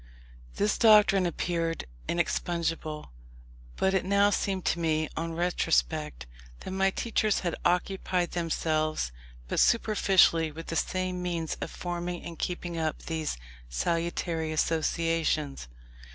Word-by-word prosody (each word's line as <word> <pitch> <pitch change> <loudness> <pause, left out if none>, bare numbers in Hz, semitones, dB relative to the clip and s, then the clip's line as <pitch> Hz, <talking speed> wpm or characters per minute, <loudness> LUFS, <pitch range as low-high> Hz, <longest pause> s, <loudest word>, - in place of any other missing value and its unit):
This 205 +1 +1
doctrine 210 -4 +6
appeared 165 -1 -2 0.2
inexpugnable; 165 - -2 0.6
but 190 - +1
it 190 - +2
now 200 +2 +3
seemed 195 -2 -1
to - - +1
me, 155 -1 +1
on 165 +1 -3
retrospect, 70 - 0 0.4
that - - -6
my 190 0 +2
teachers 215 0 0
had 175 -2 -1
occupied 180 0 0
themselves 155 - -1 0.4
but - - -1
superficially 190 -7 +4
with 165 +2 -8
the 185 +3 -1
means 175 -3 -2
of - - -3
forming 175 0 -4
and 170 -2 -8
keeping 175 -1 -3
up 155 -1 -2
these 160 - -3 0.3
salutary 165 - -1
associations. 160 - 0
170 Hz, 115 wpm, -28 LUFS, 160-185 Hz, 0.6 s, doctrine